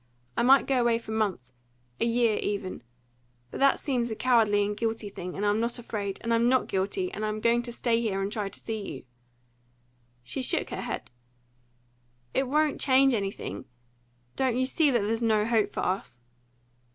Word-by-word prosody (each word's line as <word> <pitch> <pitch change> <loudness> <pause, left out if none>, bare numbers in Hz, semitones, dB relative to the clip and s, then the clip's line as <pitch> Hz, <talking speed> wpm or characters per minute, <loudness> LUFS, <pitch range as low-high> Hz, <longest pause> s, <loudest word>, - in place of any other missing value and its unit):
I - - +1
might 265 +3 +6
go 265 -2 +2
away 235 -1 +3
for 230 -1 -9
months 190 - -2 0.5
a - - +2
year, 235 -2 +2
even; 200 -2 -3 0.7
but - - -6
that 275 0 +4
seems 245 -4 -1
a 220 - -3
cowardly 215 -4 +3
and 205 +1 -2
guilty 225 -1 -2
thing, 180 -2 -7
and 205 - -2
I'm 205 +1 +2
not 235 +2 -1
afraid, 205 -4 -4
and 230 0 0
I'm 230 +1 +3
not 260 0 +2
guilty, 205 - -1
and 215 - -5
I'm 215 0 -2
going 235 +2 +3
to 240 0 -4
stay 235 -1 0
here 205 -4 -1
and 195 +1 -2
try 210 -2 -2
to - - -11
see 220 -2 -4
you." 130 - -9 1.2
She 260 - -4
shook 255 - 0
her - - -4
head. - - -5 1.2
"It 270 - +1
won't 300 +2 +1
change 270 -1 +5
anything? 195 - -3 0.7
Don't 255 -2 +1
you 260 - +2
see 295 +3 +2
that 240 -4 +2
there's 225 +3 -1
no 215 -2 +2
hope 225 -2 +2
for - - -3
us?" 180 -10 -3
230 Hz, 190 wpm, -28 LUFS, 205-245 Hz, 1.2 s, might